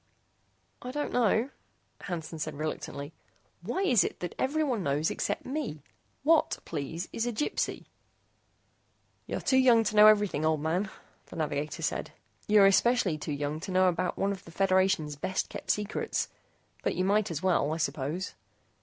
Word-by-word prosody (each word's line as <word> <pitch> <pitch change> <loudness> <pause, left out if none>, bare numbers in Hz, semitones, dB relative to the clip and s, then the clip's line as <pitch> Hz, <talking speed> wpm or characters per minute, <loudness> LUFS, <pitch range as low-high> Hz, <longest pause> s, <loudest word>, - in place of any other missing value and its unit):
"I 250 - -6
don't 295 +3 -3
know," 235 +2 +2 0.5
Hansen 165 -3 -5
said 155 -1 -3
reluctantly. 150 -1 -5 0.5
"Why 380 - -2
is 250 - +4
it - - -4
that 175 - -4
everyone 275 -5 0
knows 145 +1 0
except - - -2
me? 255 - -4 0.4
What, 320 +2 +3
please, 160 +2 -4
is 230 - -1
a - - 0
Gypsy?" 235 +7 -2 1.4
"You're - - -3
too 260 - +3
young 240 -3 +6
to 215 - -2
know 210 0 +9
everything, 205 -8 +4
old 155 -1 +2
man," 175 +6 0 0.4
the - - -11
navigator 150 -2 -3
said. - - -2 0.3
"You're 210 -1 +6
especially 195 -4 +3
too 150 - -4
young 145 +1 -2
to 185 - -6
know 185 0 +4
about 180 0 0
one 200 +1 +1
of 195 -1 -6
the - - -13
Federation's 185 -4 +2
best 185 +6 -2
kept - - -8
secrets. 210 0 -1 0.5
But - - -1
you 185 - 0
might 205 +1 +2
as 165 -1 -4
well, 170 -6 +2
I 160 - -1
suppose. 155 +3 -2
185 Hz, 165 wpm, -29 LUFS, 155-215 Hz, 1.4 s, know